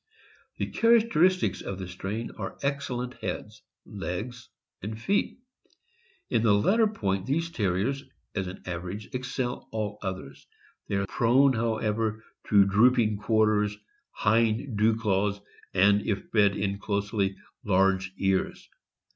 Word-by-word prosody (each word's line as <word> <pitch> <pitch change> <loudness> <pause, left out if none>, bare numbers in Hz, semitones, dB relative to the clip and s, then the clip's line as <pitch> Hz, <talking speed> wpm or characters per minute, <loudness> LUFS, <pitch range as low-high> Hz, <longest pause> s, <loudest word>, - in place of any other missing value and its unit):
The - - -1
characteristics 215 -6 +3
of 95 - -5
the 95 -1 -6
strain 100 +5 -5
are - - -7
excellent 135 -3 -2
heads, - - -5 0.2
legs, 105 +5 -6 0.3
and 110 +3 -5
feet. 200 - 0 0.9
In - - +1
the 110 -3 +4
latter 215 - +3
point 100 - -2
these 165 +5 0
Terriers, 110 - 0 0.3
as 95 -3 -2
an 95 - -9
average, 90 +6 -6
excel 125 0 -3
all 105 -2 -3
others; 95 -8 -6 0.4
they - - -2
are 100 0 +1
prone, 130 +6 +3
however, 110 -1 -1 0.2
to 100 -2 +6
drooping 110 +1 +4
quarters, 105 -1 +2 0.3
hind 115 +3 +1
dew 110 +2 +3
claws, 100 -2 0 0.3
and, 100 +2 +4
if 100 -2 -2
bred 100 -2 +4
in 100 0 -2
closely, 100 -1 -1 0.3
large 95 -2 +2
ears. 95 -1 0
105 Hz, 125 wpm, -27 LUFS, 100-120 Hz, 0.9 s, to